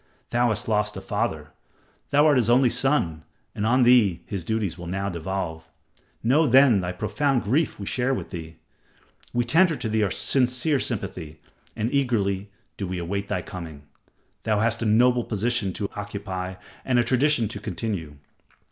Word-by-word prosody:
Thou 120 Hz, 0 st, +3 dB
hast 110 Hz, -2 st, -1 dB
lost 105 Hz, -1 st, 0 dB
a -, -, -3 dB
father. -, -, -3 dB, 0.6 s
Thou 145 Hz, +2 st, +4 dB
art 150 Hz, -3 st, +5 dB
his 120 Hz, -2 st, +2 dB
only 125 Hz, 0 st, +4 dB
son, 120 Hz, -, +1 dB, 0.3 s
and 105 Hz, -, -2 dB
on 125 Hz, +2 st, +4 dB
thee 115 Hz, -8 st, +4 dB
his 95 Hz, -4 st, -5 dB
duties 110 Hz, -1 st, -2 dB
will 85 Hz, -1 st, -9 dB
now 95 Hz, +2 st, -2 dB
devolve. 85 Hz, -2 st, -4 dB, 0.5 s
Know 145 Hz, +7 st, +4 dB
then 130 Hz, -5 st, +6 dB
thy 90 Hz, 0 st, -3 dB
profound 110 Hz, +8 st, 0 dB
grief 135 Hz, +7 st, 0 dB
we 100 Hz, -, -5 dB
share 125 Hz, +5 st, 0 dB
with 130 Hz, -, -3 dB
thee. 80 Hz, -3 st, -7 dB, 0.8 s
We 120 Hz, -, +1 dB
tender 165 Hz, +7 st, +4 dB
to 125 Hz, -3 st, -4 dB
thee 110 Hz, 0 st, 0 dB
our 105 Hz, -, +2 dB
sincere 125 Hz, +7 st, +1 dB
sympathy, 95 Hz, -10 st, -5 dB, 0.4 s
and 110 Hz, +5 st, -2 dB
eagerly 105 Hz, -8 st, 0 dB, 0.3 s
do 100 Hz, -, -3 dB
we 90 Hz, 0 st, -4 dB
await 100 Hz, +4 st, -3 dB
thy 90 Hz, -, -2 dB
coming. 80 Hz, -5 st, -8 dB, 0.6 s
Thou 110 Hz, -2 st, 0 dB
hast 115 Hz, +1 st, +1 dB
a 115 Hz, -, 0 dB
noble 120 Hz, +3 st, +4 dB
position 110 Hz, -1 st, -1 dB
to 100 Hz, -, -3 dB
occupy 100 Hz, -3 st, -5 dB, 0.3 s
and 125 Hz, -2 st, +1 dB
a 120 Hz, -, +4 dB
tradition 130 Hz, 0 st, +2 dB
to -, -, -6 dB
continue. 90 Hz, -7 st, -4 dB
110 Hz, 170 wpm, -24 LUFS, 95-125 Hz, 0.8 s, then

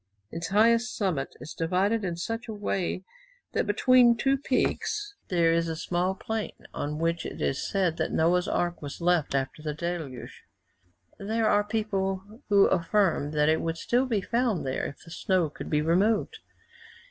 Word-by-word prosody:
Its 165 Hz, 0 st, -4 dB
highest 230 Hz, +5 st, +3 dB
summit 180 Hz, -10 st, -1 dB
is -, -, -8 dB
divided 190 Hz, +7 st, +1 dB
in 175 Hz, -3 st, -2 dB
such 225 Hz, +7 st, -4 dB
a 220 Hz, -, -5 dB
way 190 Hz, -2 st, -2 dB, 0.5 s
that -, -, 0 dB
between 240 Hz, +2 st, +5 dB
two 270 Hz, +3 st, +2 dB
peaks 410 Hz, +10 st, -1 dB
there 170 Hz, -2 st, +3 dB
is 165 Hz, 0 st, +1 dB
a 160 Hz, -, -2 dB
small 180 Hz, +3 st, -1 dB
plain, 220 Hz, +2 st, -4 dB, 0.2 s
on 150 Hz, +1 st, -3 dB
which 165 Hz, +1 st, 0 dB
it -, -, -7 dB
is 135 Hz, -, -1 dB
said 185 Hz, -5 st, +1 dB
that -, -, -1 dB
Noah's 175 Hz, +3 st, +2 dB
ark 175 Hz, 0 st, -1 dB
was 145 Hz, -2 st, -7 dB
left 170 Hz, -5 st, +1 dB
after 135 Hz, +3 st, -2 dB
the 150 Hz, -1 st, -3 dB
deluge. 160 Hz, -6 st, -5 dB, 0.8 s
There 220 Hz, +2 st, 0 dB
are 205 Hz, -, +4 dB
people 205 Hz, 0 st, -2 dB
who 200 Hz, -1 st, +6 dB
affirm 180 Hz, -4 st, +2 dB
that 150 Hz, -1 st, +2 dB
it 160 Hz, +1 st, +3 dB
would 165 Hz, 0 st, -2 dB
still 245 Hz, +8 st, +1 dB
be 220 Hz, -5 st, 0 dB
found 230 Hz, -, 0 dB
there 130 Hz, -, -2 dB
if -, -, -11 dB
the 165 Hz, -, -12 dB
snow 175 Hz, -3 st, 0 dB
could -, -, -8 dB
be 150 Hz, 0 st, +1 dB
removed. 205 Hz, -, +1 dB
185 Hz, 170 wpm, -27 LUFS, 165-220 Hz, 0.8 s, who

